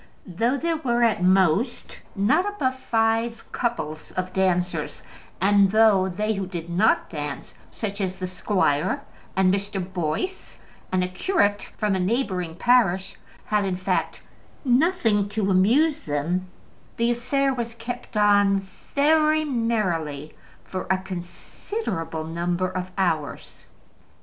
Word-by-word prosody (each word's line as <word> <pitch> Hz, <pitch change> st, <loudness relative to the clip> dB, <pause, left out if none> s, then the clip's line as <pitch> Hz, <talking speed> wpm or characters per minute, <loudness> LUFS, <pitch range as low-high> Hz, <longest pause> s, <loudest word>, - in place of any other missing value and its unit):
Though 225 Hz, +9 st, 0 dB
there 330 Hz, +3 st, -1 dB
were, 240 Hz, -5 st, +1 dB
at 225 Hz, -5 st, +2 dB
most, 190 Hz, +5 st, +2 dB, 0.2 s
not 220 Hz, -, +2 dB
above 260 Hz, -11 st, -1 dB
five 230 Hz, -1 st, 0 dB
couples 160 Hz, -11 st, -3 dB
of 185 Hz, 0 st, -3 dB
dancers, 180 Hz, -4 st, 0 dB, 0.4 s
and 200 Hz, +1 st, +4 dB
though 205 Hz, -3 st, +4 dB
they 210 Hz, +4 st, -1 dB
who 195 Hz, -2 st, -3 dB
did 170 Hz, -2 st, -6 dB
not 200 Hz, +6 st, +3 dB
dance, 145 Hz, -4 st, -6 dB, 0.2 s
such 205 Hz, -2 st, -4 dB
as 185 Hz, -1 st, -1 dB
the 185 Hz, -, -4 dB
squire 180 Hz, -5 st, 0 dB, 0.3 s
and 190 Hz, 0 st, +4 dB
Mr. 200 Hz, 0 st, -2 dB
Boyce, 175 Hz, -, -3 dB, 0.3 s
and 185 Hz, 0 st, +2 dB
a -, -, 0 dB
curate 205 Hz, -, 0 dB
from 210 Hz, -2 st, +1 dB
a 190 Hz, -, 0 dB
neighbouring 185 Hz, -5 st, -1 dB
parish, 195 Hz, -4 st, +2 dB, 0.3 s
had, 210 Hz, -1 st, +1 dB
in 190 Hz, -2 st, -1 dB
fact, 185 Hz, -, -2 dB, 0.4 s
nothing 245 Hz, -, +2 dB
to 205 Hz, -1 st, 0 dB
amuse 270 Hz, -, +3 dB
them, 160 Hz, +5 st, -1 dB, 0.5 s
the 235 Hz, +1 st, +2 dB
affair 270 Hz, +3 st, 0 dB
was 235 Hz, -2 st, -4 dB
kept 235 Hz, 0 st, -6 dB
on 205 Hz, -1 st, +4 dB, 0.3 s
very 310 Hz, +1 st, +4 dB
merrily 185 Hz, -, -1 dB, 0.3 s
for 185 Hz, -1 st, -5 dB
a 190 Hz, -, +3 dB
considerable 180 Hz, -, -5 dB
number 175 Hz, +3 st, -1 dB
of 185 Hz, 0 st, -4 dB
hours. 165 Hz, -6 st, -2 dB
200 Hz, 130 wpm, -24 LUFS, 180-235 Hz, 0.5 s, and